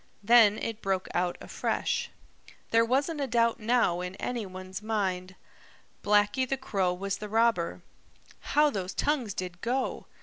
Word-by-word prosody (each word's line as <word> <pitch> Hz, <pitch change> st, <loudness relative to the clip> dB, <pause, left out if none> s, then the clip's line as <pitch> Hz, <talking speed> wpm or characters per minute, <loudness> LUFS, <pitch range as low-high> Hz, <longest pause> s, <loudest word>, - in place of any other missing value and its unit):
Then 220 Hz, -1 st, +6 dB
it 225 Hz, -1 st, -4 dB
broke 190 Hz, -1 st, -1 dB
out 175 Hz, 0 st, 0 dB
afresh. -, -, -2 dB, 0.6 s
There 230 Hz, 0 st, +5 dB
wasn't 280 Hz, +6 st, 0 dB
a 275 Hz, -, 0 dB
doubt 230 Hz, -1 st, +2 dB
now 220 Hz, -6 st, +2 dB
in 180 Hz, +1 st, -5 dB
any 235 Hz, -2 st, -3 dB
one's 185 Hz, +1 st, -8 dB
mind. 190 Hz, -4 st, -2 dB, 0.7 s
Blacky 210 Hz, +5 st, +2 dB
the 270 Hz, -, 0 dB
Crow 195 Hz, -8 st, 0 dB
was 195 Hz, +2 st, -3 dB
the 210 Hz, -, -6 dB
robber. 225 Hz, -6 st, +1 dB, 0.7 s
How 300 Hz, 0 st, +6 dB
those 190 Hz, -5 st, -4 dB
tongues 260 Hz, -9 st, 0 dB
did 180 Hz, -1 st, -5 dB
go! 255 Hz, +2 st, -2 dB
210 Hz, 145 wpm, -28 LUFS, 185-240 Hz, 0.7 s, Then